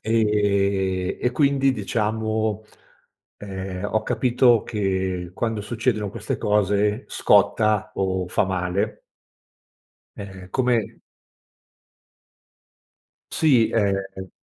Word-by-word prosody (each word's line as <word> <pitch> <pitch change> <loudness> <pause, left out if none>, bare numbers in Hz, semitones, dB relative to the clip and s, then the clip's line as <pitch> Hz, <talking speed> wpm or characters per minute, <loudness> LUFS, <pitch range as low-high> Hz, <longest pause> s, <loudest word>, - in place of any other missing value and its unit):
ehm, 100 -4 +1
e 125 - +1
quindi, 140 0 +2
diciamo, 110 0 -1 0.8
ehm, 95 -1 -6
ho 110 0 +1
capito 120 -2 +3
che 95 -4 -2
quando 115 +1 -2
succedono 110 -1 -2
queste - - -4
cose 105 +2 +1
scotta 110 -1 +2
o 95 -2 -1
fa 95 - +1
male. 95 +2 -2 1.2
Ehm, 95 -2 -9
come 125 -3 0 2.3
Sì, 130 -8 +3
ehm 95 -3 -1
105 Hz, 85 wpm, -23 LUFS, 95-110 Hz, 2.3 s, capito